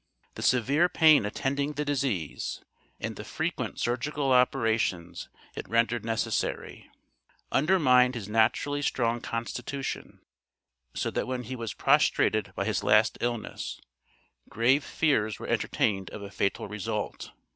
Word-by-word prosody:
The - - -8
severe 140 +8 +3
pain 155 -11 +5
attending 140 +7 -2
the 150 +1 -3
disease, 130 - -2 0.4
and - - -4
the - - -7
frequent - - -3
surgical 135 +3 -1
operations 115 -8 +1 0.3
it - - -7
rendered 115 0 +1
necessary, 115 -1 -2 0.6
undermined 130 -6 +4
his 110 -5 -5
naturally 115 +6 +1
strong 120 -4 0
constitution, 125 +4 -5 0.7
so - - -1
that - - -2
when 125 -1 -3
he 130 +3 -6
was 115 -3 -5
prostrated 110 -3 +2
by 100 - -2
his 110 -2 -1
last 105 +1 +4
illness, 120 -2 -3 0.7
grave 125 +6 +3
fears 110 -9 +1
were - - -8
entertained 95 -3 0
of 105 - -8
a 100 - -8
fatal 100 0 -1
result. 105 -1 -4
120 Hz, 125 wpm, -28 LUFS, 110-140 Hz, 0.7 s, pain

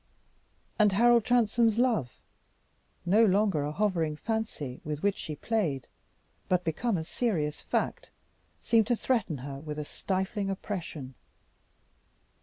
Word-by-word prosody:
And 210 -2 +5
Harold 235 +2 +5
Transome's 235 -2 +3
love, 230 - +2 0.9
no 205 +6 +5
longer 200 -5 +3
a 145 - -2
hovering 165 -4 0
fancy 215 - -3
with 150 -1 -4
which 200 -1 +2
she 155 - -6
played, 160 - -1 0.6
but 180 -1 +2
become 185 +6 0
a 160 - -2
serious 160 -6 -1
fact, - - -2 0.5
seemed 225 -3 +3
to 240 - +3
threaten 225 - 0
her 135 -1 -6
with 150 0 -6
a 150 - -3
stifling 195 +4 -2
oppression. 175 -9 -5
195 Hz, 125 wpm, -29 LUFS, 150-225 Hz, 0.9 s, And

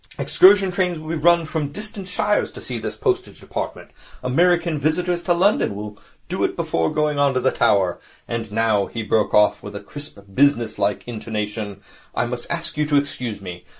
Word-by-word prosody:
Excursion 195 0 +5
trains 180 -1 0
will 155 0 -8
be 165 - -1
run 170 0 +5
from 155 -2 -2
distant 210 +2 -6
shires 210 +3 0
to - - -9
see - - -5
this - - -4
Postage 380 -3 -1
Department. - - -6 0.3
American 170 +4 +2
visitors 175 +4 0
to 175 - -1
London 185 - +2
will 105 0 -6 0.3
do - - -2
it - - 0
before 80 -1 0
going 150 -1 0
on 140 -2 +3
to - - +3
the 130 +1 +2
Tower. 95 -3 +2 0.3
And 115 -2 -4
now,' 110 -2 +2
he 115 - -5
broke 105 -1 +1
off, 105 0 +4
with 105 0 -9
a - - -4
crisp, 145 +6 -7 0.2
businesslike 115 -6 +2
intonation, 105 -3 -4 0.3
'I - - +1
must 120 0 -5
ask 165 -2 -2
you 150 0 +1
to 150 - +1
excuse 130 -7 -2
me. 90 -2 -8
140 Hz, 185 wpm, -22 LUFS, 105-170 Hz, 0.3 s, Excursion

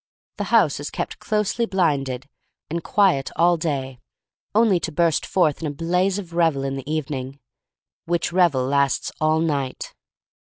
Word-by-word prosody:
The - - -2
house - - +3
is - - -5
kept - - -5
closely 215 +2 0
blinded 140 - 0 0.4
and 170 0 -2
quiet 185 -10 +2
all 175 +1 +4
day, 135 -6 -3 0.6
only 215 -5 +4
to 165 - -4
burst 165 -1 +1
forth 165 -6 +1
in 160 - -2
a 145 - -5
blaze 180 +5 +1
of 180 -4 -7
revel 165 -5 +2
in 135 0 -2
the 135 +2 -6
evening, 140 -3 -4 0.7
which 170 0 -1
revel 170 -8 +3
lasts 140 -1 +1
all 155 0 +3
night. 140 -5 -2
160 Hz, 155 wpm, -22 LUFS, 135-175 Hz, 0.7 s, all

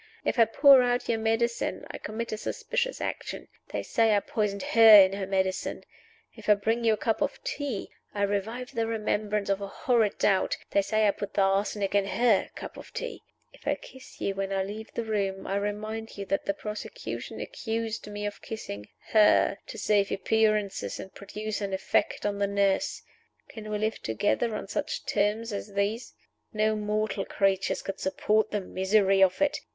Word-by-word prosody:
If - - 0
I 230 - +8
pour 270 +4 +7
out 245 0 0
your 225 -1 +1
medicine, 225 +1 0
I - - -7
commit 230 +2 -5
a 215 - -2
suspicious - - -2
action - - -4 0.2
they - - -3
say 225 -2 +3
I - - +4
poisoned 200 -2 -2
her 225 -2 +9
in 190 0 +6
her 195 -1 -3
medicine. 190 -1 -1 0.5
If - - -8
I 210 - +8
bring 225 +4 -1
you 225 -1 +4
a - - -1
cup 225 0 -1
of - - -1
tea, 285 - -4 0.2
I 205 - -2
revive 225 +6 -2
the 230 -2 0
remembrance 210 -2 -1
of 195 0 0
a 200 - -3
horrid 225 0 +1
doubt 195 -2 +2
they 200 - +4
said 215 +2 +1
I - - +5
put 200 0 -7
the 195 - +4
arsenic 195 +1 0
in 200 -1 +2
her 225 -1 +2
cup - - -8
of - - -11
tea. - - -5 0.3
If - - -16
I - - +2
kiss 260 0 -14
you 200 - -1
when 195 0 -3
I 195 -1 +1
leave 215 +3 -7
the 235 - -1
room, 200 -3 -2
I 195 - -1
remind 215 +2 -4
you 200 - -4
that 195 0 -1
the 200 - 0
prosecution 210 - -6
accused 225 - -4
me 205 0 -5
of 205 - -5
kissing 105 - -7 0.2
her, 210 -2 +4
to - - -8
save 205 -1 +2
appearances 210 - +1
and 190 - -9
produce 210 +2 -5
an 200 -1 -3
effect 190 - 0
on 205 -1 -1
the 200 - +2
nurse. 200 -1 0 0.5
Can 215 -1 -8
we 210 - -1
live 215 +1 -2
together 110 - 0
on - - -5
such - - -3
terms 210 +2 0
as 200 0 -5
these? 205 +4 -2 0.4
No 215 0 +2
mortal 210 -1 -1
creatures 195 -1 0
could 195 - -5
support 210 +3 +1
the 210 - -1
misery 195 +1 +2
of 185 -1 +4
it. 290 +1 +1
210 Hz, 190 wpm, -28 LUFS, 200-225 Hz, 0.5 s, her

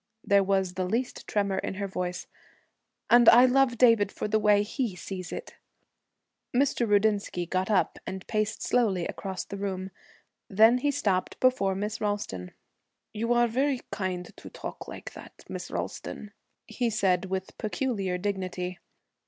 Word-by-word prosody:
There 200 -1 +4
was 190 -2 +1
the 185 0 -2
least 240 +4 -2
tremor 200 -2 0
in - - -4
her 200 +1 -3
voice. 180 -1 -4 0.9
'And 240 -1 +8
I 245 +2 +8
love 255 -1 +3
David 230 -5 +5
for - - -4
the 215 +1 +2
way 205 -1 +4
he 225 -2 -3
sees 185 0 -6
it.' - - -7 1.0
Mr. 255 -3 +2
Rudinsky 205 -3 +2
got 185 +3 -1
up 200 -4 +1
and 190 0 -5
paced 215 0 -1
slowly 200 -8 +1
across 190 -3 -4
the 200 - -7
room. 190 -1 -4 0.6
Then 220 +5 +5
he 290 - +1
stopped 195 -9 0
before 225 -7 +2
Miss 210 +3 -3
Ralston. 205 - -2 0.6
'You 230 +2 -2
are 240 0 +4
very 265 +3 0
kind 185 -3 -4
to - - -10
talk - - -8
like - - -8
that, - - -13
Miss - - -6
Ralston,' 210 - -5 0.3
he 245 -2 -1
said, 190 -4 +1
with 190 0 -4
peculiar 210 -5 -1
dignity. 185 -1 -3
205 Hz, 155 wpm, -28 LUFS, 190-230 Hz, 1.0 s, And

